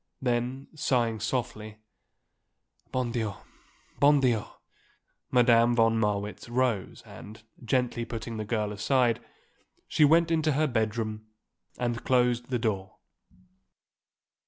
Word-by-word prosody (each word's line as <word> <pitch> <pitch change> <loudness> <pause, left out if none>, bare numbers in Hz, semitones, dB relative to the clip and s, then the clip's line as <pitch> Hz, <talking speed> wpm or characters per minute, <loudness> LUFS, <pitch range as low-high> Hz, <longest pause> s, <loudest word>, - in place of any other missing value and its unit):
Then, 125 +2 -2
sighing 120 -7 0
softly, 110 -2 -3 1.1
"Bon 125 -2 -1
Dieu! 110 -4 -2 0.6
bon 145 0 +5
Dieu!" 120 -5 +1 0.8
Madame 120 -1 +4
von 115 -1 +3
Marwitz 105 +1 -2
rose 120 -5 -1
and, 110 +2 -12 0.2
gently 120 0 0
putting 115 -1 -6
the 110 - -3
girl 105 -1 -2
aside, 120 +2 +1 0.6
she 155 - +2
went 165 +3 +5
into 160 -2 +2
her 155 +3 +2
bedroom 110 -3 -2 0.5
and 120 -1 -2
closed 125 -1 +1
the 125 - 0
door. 100 -5 -3
120 Hz, 110 wpm, -28 LUFS, 110-130 Hz, 1.1 s, bon